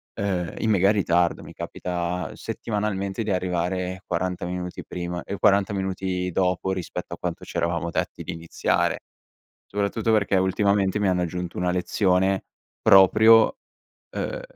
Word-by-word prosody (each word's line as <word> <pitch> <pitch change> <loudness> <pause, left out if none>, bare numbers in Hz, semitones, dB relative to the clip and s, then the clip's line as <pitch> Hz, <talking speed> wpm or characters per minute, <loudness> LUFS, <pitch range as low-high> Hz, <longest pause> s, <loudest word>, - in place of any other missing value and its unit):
ehm, 90 -4 -2
in 110 - 0
mega 100 0 +4
ritardo. 90 -4 +1
Mi - - -11
capita 90 0 -4
settimanalmente 105 -1 -3
di 105 - -2
arrivare 90 0 -1
40 90 +1 -2
minuti 90 0 -5
prima, 90 0 -4
ehm 100 - -5
40 100 -1 +3
minuti 95 -1 -2
dopo, 90 +1 0
rispetto 90 -2 -5
a - - -22
quanto - - -4
c'eravamo 85 0 -2
detti - - -3
di - - -5
iniziare. 85 0 0 0.7
Soprattutto 105 +3 -1
perché 100 -2 +2
ultimamente 95 +1 +2
mi 100 - +2
hanno 90 -1 +1
aggiunto 90 0 -4
una 90 0 +1
lezione 95 +1 +1 0.4
proprio 110 - +7 0.6
uhm, - - -3
95 Hz, 135 wpm, -24 LUFS, 90-100 Hz, 0.7 s, proprio